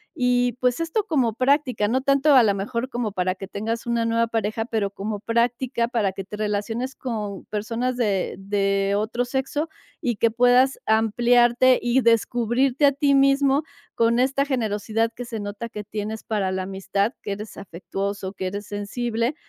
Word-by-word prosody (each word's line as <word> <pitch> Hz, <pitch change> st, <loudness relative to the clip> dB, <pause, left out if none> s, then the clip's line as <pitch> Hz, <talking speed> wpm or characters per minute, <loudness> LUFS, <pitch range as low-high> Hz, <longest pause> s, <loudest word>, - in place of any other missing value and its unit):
y 245 Hz, -1 st, +2 dB
pues 250 Hz, +1 st, +1 dB
esto 330 Hz, +6 st, -1 dB
como 260 Hz, -, +1 dB
práctica, 255 Hz, -3 st, +1 dB
no 255 Hz, +4 st, +1 dB
tanto 275 Hz, +2 st, +4 dB
a 255 Hz, -, +8 dB
lo 205 Hz, -2 st, +3 dB
mejor 230 Hz, +6 st, -3 dB
como 240 Hz, -4 st, -2 dB
para 185 Hz, -1 st, 0 dB
que 195 Hz, +1 st, -9 dB
tengas 225 Hz, +4 st, -4 dB
una 235 Hz, -1 st, +1 dB
nueva 230 Hz, 0 st, +1 dB
pareja, 225 Hz, 0 st, -2 dB
pero 220 Hz, -4 st, -1 dB
como 205 Hz, +1 st, -4 dB
práctica 235 Hz, +2 st, 0 dB
para 220 Hz, -6 st, 0 dB
que 195 Hz, -, -6 dB
te 210 Hz, +2 st, -8 dB
relaciones 220 Hz, +5 st, -2 dB
con 210 Hz, -6 st, -5 dB
personas 230 Hz, +4 st, -2 dB
de 205 Hz, -6 st, 0 dB
de 195 Hz, 0 st, 0 dB
otro 230 Hz, +4 st, -1 dB
sexo 270 Hz, +5 st, -2 dB, 0.3 s
y 240 Hz, -8 st, -1 dB
que 230 Hz, -, +3 dB
puedas 245 Hz, +3 st, +4 dB
ampliarte 240 Hz, +3 st, +4 dB
y 240 Hz, +2 st, +2 dB
descubrirte 240 Hz, +4 st, +2 dB
a -, -, +5 dB
ti 280 Hz, 0 st, +2 dB
mismo 275 Hz, +1 st, +3 dB, 0.3 s
con 230 Hz, +1 st, +2 dB
esta 270 Hz, +2 st, +2 dB
generosidad 225 Hz, -3 st, -1 dB
que 245 Hz, -, -6 dB
se 230 Hz, -2 st, -5 dB
nota 205 Hz, +3 st, -5 dB
que 210 Hz, -1 st, -7 dB
tienes 210 Hz, +1 st, -5 dB
para 200 Hz, -4 st, -1 dB
la 190 Hz, 0 st, -2 dB
amistad 195 Hz, +3 st, -1 dB
que -, -, -4 dB
eres 210 Hz, +2 st, -8 dB
afectuoso, 195 Hz, +1 st, -5 dB
que 190 Hz, -2 st, -4 dB
eres 200 Hz, +2 st, -5 dB
sensible, 230 Hz, +5 st, -2 dB
230 Hz, 170 wpm, -23 LUFS, 205-250 Hz, 0.3 s, a